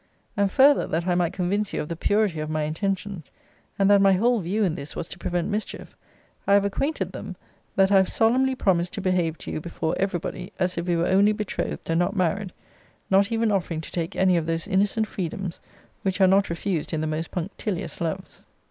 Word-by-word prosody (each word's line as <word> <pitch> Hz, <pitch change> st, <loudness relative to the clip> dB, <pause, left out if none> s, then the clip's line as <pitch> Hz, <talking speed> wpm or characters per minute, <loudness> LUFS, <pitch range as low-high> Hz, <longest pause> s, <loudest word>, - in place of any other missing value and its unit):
And 200 Hz, -1 st, +1 dB
further 280 Hz, +6 st, +5 dB
that 165 Hz, +2 st, -1 dB
I 180 Hz, -, +2 dB
might 175 Hz, -1 st, +1 dB
convince 195 Hz, +3 st, -1 dB
you -, -, -1 dB
of -, -, -8 dB
the 170 Hz, -, -4 dB
purity 205 Hz, -1 st, +1 dB
of 155 Hz, 0 st, -3 dB
my 155 Hz, 0 st, -1 dB
intentions, 190 Hz, +1 st, -3 dB, 0.5 s
and 195 Hz, -, +3 dB
that 200 Hz, -1 st, +6 dB
my 195 Hz, -1 st, +6 dB
whole 235 Hz, +5 st, +3 dB
view 200 Hz, +4 st, 0 dB
in 180 Hz, -5 st, +1 dB
this 150 Hz, -3 st, -7 dB
was -, -, -4 dB
to 180 Hz, -, -9 dB
prevent 175 Hz, +1 st, -1 dB
mischief, 210 Hz, +1 st, -4 dB, 0.5 s
I 200 Hz, -, +6 dB
have 200 Hz, 0 st, +4 dB
acquainted 275 Hz, +10 st, -1 dB
them, -, -, -7 dB, 0.4 s
'that 195 Hz, 0 st, +4 dB
I 200 Hz, -, +6 dB
have 190 Hz, -1 st, +3 dB
solemnly 260 Hz, +4 st, +2 dB
promised 180 Hz, -6 st, +1 dB
to 200 Hz, -, -4 dB
behave 180 Hz, -4 st, 0 dB
to -, -, -7 dB
you -, -, -3 dB
before 160 Hz, -1 st, -3 dB
every 195 Hz, -2 st, +1 dB
body, 180 Hz, +2 st, -6 dB
as 185 Hz, -1 st, 0 dB
if 170 Hz, +1 st, -3 dB
we 175 Hz, -, +2 dB
were 170 Hz, 0 st, +1 dB
only 200 Hz, +3 st, +4 dB
betrothed, 210 Hz, -2 st, -4 dB
and 165 Hz, 0 st, +1 dB
not 175 Hz, +4 st, 0 dB
married; 185 Hz, +1 st, 0 dB, 0.6 s
not 200 Hz, +3 st, +4 dB
even 225 Hz, -1 st, +1 dB
offering 170 Hz, -5 st, -1 dB
to -, -, -10 dB
take 170 Hz, -2 st, -3 dB
any 185 Hz, -2 st, +3 dB
of 165 Hz, -1 st, -1 dB
those 165 Hz, 0 st, -2 dB
innocent 205 Hz, +3 st, +2 dB
freedoms 185 Hz, -2 st, -5 dB, 0.4 s
which 190 Hz, 0 st, -1 dB
are 190 Hz, -, +6 dB
not 195 Hz, +2 st, +4 dB
refused 170 Hz, -1 st, -2 dB
in 155 Hz, -, 0 dB
the -, -, -1 dB
most 155 Hz, +1 st, -3 dB
punctilious 185 Hz, +1 st, -4 dB
loves.' 170 Hz, +3 st, -4 dB
185 Hz, 220 wpm, -25 LUFS, 170-200 Hz, 0.6 s, that